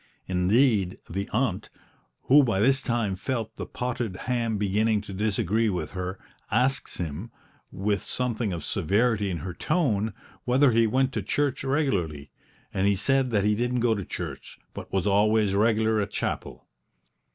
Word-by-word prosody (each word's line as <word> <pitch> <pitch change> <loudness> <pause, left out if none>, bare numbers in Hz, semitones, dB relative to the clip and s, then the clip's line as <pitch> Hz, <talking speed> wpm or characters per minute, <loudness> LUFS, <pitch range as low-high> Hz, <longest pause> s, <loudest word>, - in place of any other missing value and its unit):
Indeed, 95 +1 +2
the 100 +4 -4
aunt, 110 -4 -1 0.5
who 145 +3 +6
by 115 -8 +1
this 135 +6 +4
time 115 -5 -1
felt 115 +1 -3
the - - -5
potted 120 -5 -3
ham 115 -3 0
beginning 105 +2 +1
to 100 -1 -9
disagree 105 +2 +1
with 90 -3 -3
her, 95 0 -4 0.3
asked 130 +5 0
him, 85 +6 -5 0.4
with 100 +1 -1
something 120 -4 -1
of 85 -4 -4
severity 105 +5 +1
in 90 - -2
her 90 - -4
tone, 110 - 0 0.3
whether 130 +2 +4
he 115 0 +4
went 130 +3 +1
to - - -1
church 145 -3 -1
regularly; 95 - -1 0.4
and 95 +1 +1
he 100 - +3
said 135 +6 +1
that 105 -4 +1
he 105 - +3
didn't 120 +2 0
go 120 -1 +3
to 100 -3 -3
church, - - -7 0.2
but - - -8
was 95 -2 0
always 105 0 +3
regular 110 +1 +2
at 100 - -2
chapel. - - -4
110 Hz, 160 wpm, -26 LUFS, 95-125 Hz, 0.5 s, who